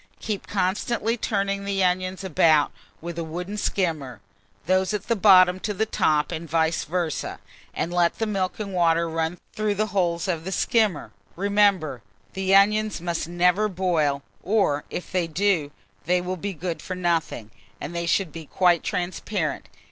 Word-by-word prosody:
Keep 210 -3 -4
constantly 210 +4 0
turning 200 -3 -1
the 200 -1 0
onions 185 +1 0
about 155 -4 +3 0.3
with 170 0 -5
a - - -2
wooden 175 +5 -5
skimmer, 160 - -2 0.5
those 185 +4 +2
at 205 - -4
the 230 - +2
bottom 185 -3 +6
to 210 +1 -3
the 220 - +1
top, 155 -8 +1
and 165 -1 -5
vice 160 +1 +1
versâ; 170 -1 -2 0.3
and 175 - -3
let 175 -1 +2
the 225 - 0
milk 195 -3 -2
and 200 -2 -4
water 170 -1 +2
run 165 +1 -2 0.2
through 210 -1 -1
the 215 +2 +1
holes 170 -3 0
of 170 -4 -1
the 190 - -5
skimmer. 210 -4 +1 0.2
Remember, 195 - +2 0.3
the 190 0 +2
onions 210 +1 +3
must 170 -2 -3
never 180 +4 +3
boil, 165 -7 0 0.2
or, 185 -8 +1
if 180 - -6
they 180 -2 0
do, 170 -3 +1 0.4
they 180 +1 +2
will 180 +1 -3
be 195 +3 -4
good 170 0 -4
for 185 - -5
nothing; 165 -11 -1 0.3
and 170 - -6
they 170 0 -2
should 180 -1 +1
be 160 0 -9
quite 175 -3 +3
transparent. 180 -1 -3
180 Hz, 165 wpm, -24 LUFS, 165-200 Hz, 0.5 s, bottom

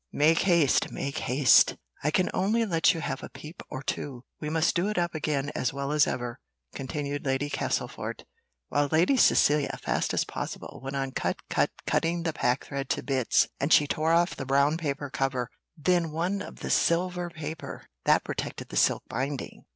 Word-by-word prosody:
Make 160 +3 +4
haste, 170 -7 +3
make 140 +3 -3
haste! 130 -2 +5 0.3
I 150 - +2
can 180 +4 +1
only 220 +5 +1
let 165 -5 +3
you 165 - -4
have 135 -3 -3
a - - -8
peep 155 +3 -10
or 130 - -6
two. 130 -3 -4 0.2
We 150 - -4
must 160 +1 +1
do 180 +3 +1
it 210 - -3
up 175 -1 0
again 145 -2 -1
as 130 - -1
well 140 0 -3
as 150 -1 +4
ever," 120 -1 -3 0.3
continued 145 +1 -4
Lady 135 +2 -1
Castlefort, - - -3 0.5
while 145 0 +2
Lady 170 - +4
Cecilia, 150 - +4
fast - - -1
as - - +1
possible, - - -6
went 135 +1 -4
on 135 -1 -2
cut, - - -3
cut, - - +2 0.2
cutting 170 +1 0
the 165 -2 -1
packthread 135 +1 -1
to - - -1
bits, 130 -4 +2
and 140 +3 -1
she 150 - +7
tore 155 +2 0
off 170 +2 +3
the - - -5
brown 140 +3 +3
paper 145 -3 -3
cover, 130 -3 -1 0.3
then 175 +1 +2
one 175 +6 -1
of - - -8 0.2
silver 175 +1 +1
paper, 160 -1 -7 0.2
that - - +4
protected - - -5
the - - -4
silk - - +3
binding. 135 +2 -4
150 Hz, 180 wpm, -27 LUFS, 135-170 Hz, 0.5 s, she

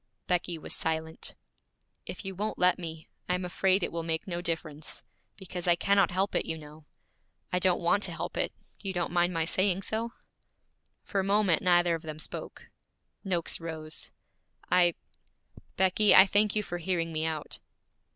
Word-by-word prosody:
Becky 175 -1 0
was 155 - -5
silent. 160 0 -2 0.7
'If - - -7
you 195 - -4
won't 210 +4 -3
let 180 0 +4
me, 160 -2 -7 0.2
I 180 - +3
am 180 0 -3
afraid 190 +1 +2
it - - 0
will 170 - -3
make 160 -1 -2
no 175 -2 -3
difference, 160 -3 -4 0.3
because 180 -2 -6
I 175 - +6
cannot 200 +3 +3
help 190 +2 0
it, - - +1
you 160 - -2
know. 150 0 -13 0.7
I 180 - +3
don't 180 -1 +2
want 185 +4 +3
to - - -3
help - - -5
it; - - 0 0.3
you 195 -2 -3
don't 175 -2 -1
mind 175 0 +2
my 165 -2 0
saying 185 +2 +2
so?' 230 +3 -2 0.9
For 200 - -2
a - - +1
moment 200 -3 +3
neither 175 -1 +4
of 165 - -2
them 155 -1 -6
spoke. 155 - -6 0.5
Noakes 180 -4 0
rose. 160 -2 -4 0.6
'I 175 -2 +5 0.8
Becky, 190 +3 +5
I 190 - +10
thank 205 +2 +2
you 210 - +1
for 175 -2 -5
hearing 170 -2 -1
me 155 0 -1
out.' 155 -2 -4
175 Hz, 175 wpm, -29 LUFS, 165-190 Hz, 0.9 s, I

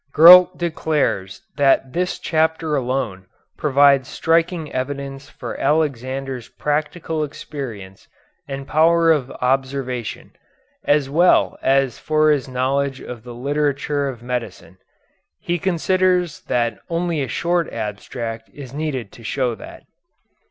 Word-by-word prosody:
Gurlt 180 +3 +9
declares 155 - -1
that 135 -2 +3
this 180 +1 -1
chapter 160 -1 0
alone 125 -8 -2 0.3
provides 140 -2 +4
striking 165 -1 0
evidence 140 +1 -4
for - - -7
Alexander's 135 -4 -1
practical 155 +2 -2
experience 120 -10 -8 0.4
and 135 -1 -6
power 165 +1 +4
of 140 -5 +1
observation, 130 -2 -2 0.5
as 145 -2 +2
well 170 +6 +3
as 135 -2 +2
for 155 0 +2
his 145 -3 0
knowledge 135 +1 -1
of 120 -2 -8
the 120 +1 -10
literature 145 +2 -1
of 120 -3 -9
medicine. 115 -8 -5 0.6
He 175 0 -2
considers 180 -1 +1
that 120 -3 0
only 170 -2 -1
a 135 - -2
short 170 +7 0
abstract 115 +2 -5
is 135 -3 -9
needed 140 -7 -3
to 115 - -14
show 125 +2 -1
that. 110 - -11
140 Hz, 115 wpm, -21 LUFS, 125-155 Hz, 0.6 s, Gurlt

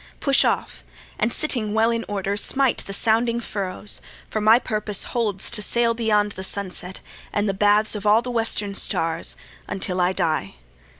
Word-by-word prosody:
Push - - +3
off, 65 - -1 0.4
and 225 +2 +1
sitting 225 -8 0
well 225 +1 +3
in 230 0 -1
order 200 -1 -2
smite 265 +5 +1
The - - -7
sounding 230 +3 +2
furrows; 205 -2 -3 0.3
for 215 - -1
my 220 +2 +6
purpose 210 -4 -2
holds 210 -5 -2
To 235 -3 0
sail 235 +3 +1
beyond 210 -3 +1
the 190 - -7
sunset, 190 -1 -3 0.3
and 205 +1 0
the 195 - 0
baths 205 +2 +3
Of 210 -2 -4
all 215 +3 +5
the 250 - -4
western 225 -3 0
stars, 165 -3 0 0.3
until 185 -1 -2
I 180 +1 +3
die. 160 - -1
210 Hz, 170 wpm, -23 LUFS, 195-230 Hz, 0.4 s, my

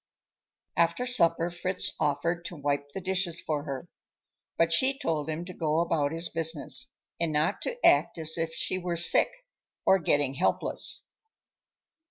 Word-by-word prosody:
After 170 +8 +1
supper 170 -8 +2
Fritz 180 +2 -1
offered 160 +4 0
to 175 - -6
wipe 145 -1 -2
the 195 - -6
dishes 185 -2 -1
for 150 -2 -3
her, 135 -3 -5 0.7
but 165 0 +3
she 265 +9 +3
told 160 - -2
him 160 +2 -3
to 180 - -8
go 155 -3 -1
about 160 -4 +1
his 165 +1 0
business, 160 -2 -1 0.3
and 165 -1 0
not 150 +1 0
to 475 - -3
act 145 +4 +4
as 160 0 0
if 165 -1 -2
she 175 +3 -1
were 175 -1 -3
sick 170 - +6 0.6
or 190 - +5
getting 145 -4 +1
helpless. 135 - -1
165 Hz, 155 wpm, -28 LUFS, 150-175 Hz, 0.7 s, sick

